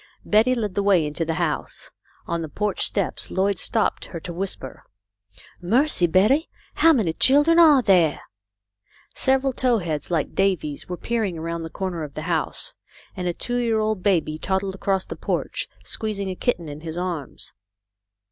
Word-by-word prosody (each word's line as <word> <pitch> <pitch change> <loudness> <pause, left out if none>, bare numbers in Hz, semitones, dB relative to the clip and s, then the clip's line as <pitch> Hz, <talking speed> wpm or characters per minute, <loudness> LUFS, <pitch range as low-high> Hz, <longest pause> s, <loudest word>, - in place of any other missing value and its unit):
Betty 225 +4 +3
led 210 -5 -3
the 200 - 0
way 195 -5 +3
into 150 +3 -3
the 160 0 -2
house. 160 -3 -3 0.3
On 170 0 -2
the 160 - -5
porch 210 +6 -2
steps 200 -3 +3
Lloyd 195 -1 0
stopped 225 -2 0
her 170 - -7
to 175 - -7
whisper: 180 -7 -5 0.4
" 100 - -24 0.2
Mercy, 275 - +3
Betty! 215 - +3 0.2
How 330 - +5
many 215 - +1
children 295 - +5
are 300 -6 +7
there? 175 -8 +3 0.5
" 100 0 -61 0.3
Several 265 0 +2
tow 250 -2 +2
heads 160 -6 -4
like 165 -4 -1
Davy's 180 -8 -1
were 180 - -4
peering 220 -6 -2
around 165 +1 -4
the 165 - -6
corner 185 -2 -4
of 150 -2 -7
the 155 - -5
house, 165 -2 -1 0.4
and 180 -1 -3
a 175 - 0
two 245 0 -1
year 230 -2 +1
old 215 -3 -1
baby 165 -5 0
toddled 190 +2 -1
across 195 0 -1
the - - -7
porch, - - -3 0.2
squeezing 200 -3 -3
a - - -5
kitten 180 -7 -1
in 145 0 -8
his 165 0 -6
arms. 175 -6 -5
185 Hz, 175 wpm, -23 LUFS, 165-220 Hz, 0.5 s, are